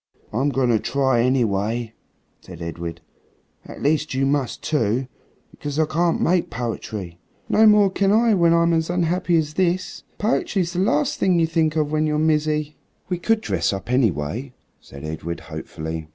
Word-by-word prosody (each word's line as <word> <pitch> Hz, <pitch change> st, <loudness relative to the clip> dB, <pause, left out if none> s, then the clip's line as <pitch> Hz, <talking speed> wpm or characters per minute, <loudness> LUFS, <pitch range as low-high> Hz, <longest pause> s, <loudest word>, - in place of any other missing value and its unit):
"I'm 135 Hz, +6 st, +1 dB
going 135 Hz, -3 st, +1 dB
to 115 Hz, -2 st, +3 dB
try, 130 Hz, -2 st, +1 dB
anyway," 115 Hz, -2 st, 0 dB, 0.5 s
said 85 Hz, -3 st, -12 dB
Edred, 85 Hz, 0 st, -6 dB, 0.6 s
"at -, -, -10 dB
least 150 Hz, -1 st, +1 dB
you 135 Hz, +1 st, +1 dB
must 140 Hz, -2 st, -1 dB
too. 130 Hz, -4 st, 0 dB, 0.5 s
Because 145 Hz, 0 st, -6 dB
I 160 Hz, -, +3 dB
can't 165 Hz, +2 st, 0 dB
make 175 Hz, 0 st, +1 dB
poetry." 110 Hz, -7 st, -5 dB, 0.3 s
"No 220 Hz, 0 st, +5 dB
more 210 Hz, -2 st, +5 dB
can 195 Hz, +1 st, +1 dB
I 225 Hz, +1 st, +4 dB
when 170 Hz, -4 st, +4 dB
I'm 170 Hz, 0 st, +3 dB
as 160 Hz, 0 st, 0 dB
unhappy 175 Hz, 0 st, +1 dB
as 155 Hz, -1 st, -1 dB
this. 185 Hz, +1 st, -1 dB, 0.2 s
Poetry's 195 Hz, -5 st, 0 dB
the 180 Hz, -, -2 dB
last 150 Hz, -6 st, +1 dB
thing 185 Hz, -2 st, +3 dB
you 165 Hz, -, +4 dB
think 160 Hz, -1 st, 0 dB
of 150 Hz, -2 st, 0 dB
when 155 Hz, 0 st, +1 dB
you're 150 Hz, 0 st, 0 dB
mizzy." 150 Hz, -1 st, 0 dB, 0.3 s
"We 180 Hz, -2 st, -1 dB
could 225 Hz, +4 st, +1 dB
dress -, -, 0 dB
up, 100 Hz, +4 st, -5 dB
anyway," 115 Hz, -, 0 dB, 0.3 s
said 70 Hz, +1 st, -13 dB
Edred 80 Hz, +2 st, -5 dB
hopefully. 80 Hz, 0 st, -6 dB
145 Hz, 165 wpm, -22 LUFS, 110-170 Hz, 0.6 s, No